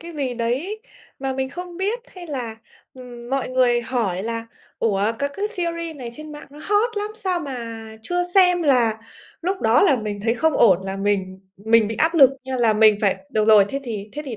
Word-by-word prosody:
cái 340 Hz, +1 st, -9 dB
gì 275 Hz, -5 st, -3 dB
đấy 265 Hz, -, -2 dB, 0.4 s
mà 265 Hz, 0 st, -2 dB
mình 265 Hz, 0 st, -2 dB
không 355 Hz, +3 st, -8 dB
biết 410 Hz, +6 st, -1 dB, 0.2 s
hay 355 Hz, -1 st, -9 dB
là, 245 Hz, -7 st, -5 dB, 0.4 s
ừm, 245 Hz, -2 st, -11 dB
mọi 270 Hz, -1 st, -1 dB
người 250 Hz, -2 st, +2 dB
hỏi 225 Hz, -7 st, -2 dB
là 230 Hz, +1 st, -4 dB, 0.3 s
"Ủa, 210 Hz, 0 st, +1 dB
các 280 Hz, 0 st, -1 dB
cái 415 Hz, +1 st, -2 dB
series 335 Hz, -6 st, -4 dB
này 250 Hz, -3 st, -7 dB
trên 305 Hz, +4 st, -10 dB
mạng 295 Hz, -, -10 dB
nó 290 Hz, -, -13 dB
hot 420 Hz, +2 st, +1 dB
lắm, 415 Hz, +1 st, -2 dB
sao 375 Hz, -5 st, -1 dB
mà 230 Hz, -6 st, -6 dB, 0.2 s
chưa 355 Hz, +6 st, -1 dB
xem" 360 Hz, -2 st, +5 dB
là 245 Hz, -7 st, +3 dB, 0.4 s
lúc 375 Hz, +2 st, -2 dB
đó 225 Hz, +2 st, +4 dB
là 325 Hz, -9 st, +4 dB
mình 210 Hz, -3 st, -4 dB
thấy 230 Hz, +2 st, +1 dB
không 320 Hz, +4 st, +1 dB
ổn 190 Hz, -5 st, +5 dB
là 195 Hz, 0 st, -4 dB
mình 195 Hz, -2 st, -1 dB, 0.2 s
mình 220 Hz, +1 st, +3 dB
bị 225 Hz, -, -4 dB
áp 325 Hz, +6 st, +2 dB
lực 275 Hz, -5 st, +7 dB
như 260 Hz, 0 st, -3 dB
là 230 Hz, -3 st, +3 dB
mình 215 Hz, 0 st, +5 dB
phải: 195 Hz, -3 st, +2 dB
"Được 215 Hz, -, +1 dB
rồi, 210 Hz, -2 st, +8 dB
thế 275 Hz, -, -4 dB
thì 215 Hz, -5 st, -6 dB
thế 300 Hz, -, -5 dB
thì 250 Hz, -5 st, -6 dB
255 Hz, 215 wpm, -22 LUFS, 225-335 Hz, 0.4 s, rồi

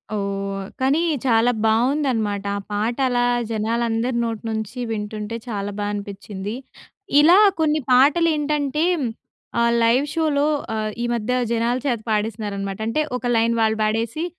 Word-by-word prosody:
ఓహ్! 195 Hz, -1 st, -3 dB
కానీ 270 Hz, +4 st, +3 dB, 0.3 s
చాలా 235 Hz, -1 st, +4 dB
బావుందనమాట 225 Hz, -3 st, +1 dB
ఆ -, -, -3 dB
పాట 215 Hz, +3 st, -1 dB
అలా 245 Hz, -1 st, +1 dB, 0.3 s
జనాలందరి 230 Hz, +2 st, -1 dB
నోటి 225 Hz, -1 st, -3 dB
నుంచి 220 Hz, +2 st, -4 dB
వింటుంటే 210 Hz, +1 st, -4 dB
చాలా 205 Hz, -3 st, -3 dB
బా 205 Hz, -, -1 dB
అనిపిచ్చింది. 200 Hz, 0 st, -6 dB, 0.7 s
ఇలా 340 Hz, +5 st, +7 dB, 0.2 s
కొన్ని 310 Hz, -1 st, +2 dB
పాటలు 290 Hz, +7 st, +5 dB
ఏంటంటే, 295 Hz, 0 st, 0 dB, 0.8 s
ఆహ్, 235 Hz, 0 st, +3 dB
లైవ్ 240 Hz, +5 st, +3 dB
షోలో 300 Hz, -3 st, +1 dB, 0.3 s
ఆహ్, 215 Hz, 0 st, -1 dB
ఈ -, -, 0 dB
మధ్య 235 Hz, +2 st, -2 dB, 0.2 s
జనాల 235 Hz, +1 st, +1 dB
చేత 240 Hz, -4 st, 0 dB
పాడిస్తున్నారనమాట. 205 Hz, -2 st, -2 dB
అంటే 305 Hz, +7 st, +1 dB
ఒక 245 Hz, -1 st, -2 dB
లైన్ 230 Hz, +1 st, +2 dB
వాళ్ళు 220 Hz, 0 st, +1 dB
పాడేసి 225 Hz, +8 st, -1 dB
230 Hz, 135 wpm, -22 LUFS, 210-255 Hz, 0.8 s, ఇలా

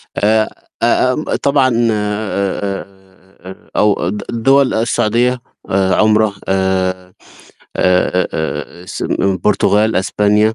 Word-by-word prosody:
آآ 110 Hz, +1 st, +2 dB, 0.4 s
آمم، 130 Hz, +5 st, +2 dB, 0.2 s
طبعًا 140 Hz, -2 st, +3 dB, 0.2 s
آآ 105 Hz, -2 st, -2 dB, 0.9 s
أو 105 Hz, -4 st, +2 dB
د 105 Hz, +1 st, -4 dB
دَول 135 Hz, +3 st, +3 dB
السعودية 120 Hz, +2 st, +1 dB, 0.3 s
آآ 95 Hz, -1 st, +2 dB
عُمرَة 110 Hz, -1 st, +3 dB
آآ 95 Hz, -1 st, -1 dB, 0.6 s
آآ 90 Hz, 0 st, +2 dB
آآ 80 Hz, +2 st, -4 dB
السن -, -, -4 dB
البرتغال، 105 Hz, +2 st, +2 dB
إسبانيا، 105 Hz, +3 st, +2 dB
105 Hz, 90 wpm, -16 LUFS, 95-110 Hz, 0.9 s, طبعًا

